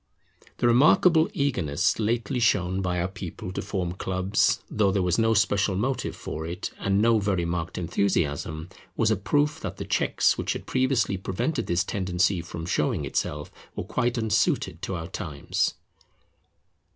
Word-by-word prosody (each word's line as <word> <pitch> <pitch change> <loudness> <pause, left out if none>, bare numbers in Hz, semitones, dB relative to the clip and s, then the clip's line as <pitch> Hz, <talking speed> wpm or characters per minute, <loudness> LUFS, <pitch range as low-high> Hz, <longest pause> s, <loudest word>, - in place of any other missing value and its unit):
The - - 0
remarkable 160 - +5
eagerness 115 - 0
lately 120 +4 0
shown 95 -5 +2
by 90 -1 -1
our 85 - 0
people 90 -1 -7
to - - -3
form 95 -3 -2
clubs, 95 +2 +1
though 100 -2 +2
there 95 -1 +1
was 90 +4 +1
no 115 0 +3
special 100 -1 +2
motive 125 +6 -1
for 80 - -6
it, 90 +3 -5
and 100 0 +1
no 115 -1 +4
very 95 -4 0
marked 85 -1 -3
enthusiasm, 80 -3 -1 0.3
was 110 -1 +3
a - - +4
proof 145 +9 +1
that - - -6
the - - -5
checks - - +2
which - - -1
had - - -7
previously 130 -6 +1
prevented 95 - -2
this 85 +2 +1
tendency 95 -2 0
from 85 0 -7
showing 90 - 0
itself 75 +2 -3 0.2
were - - -3
quite 120 +5 -1
unsuited 110 -2 +1
to 95 - -3
our 80 -1 -5
times. 75 -5 -2
95 Hz, 160 wpm, -26 LUFS, 90-115 Hz, 0.3 s, remarkable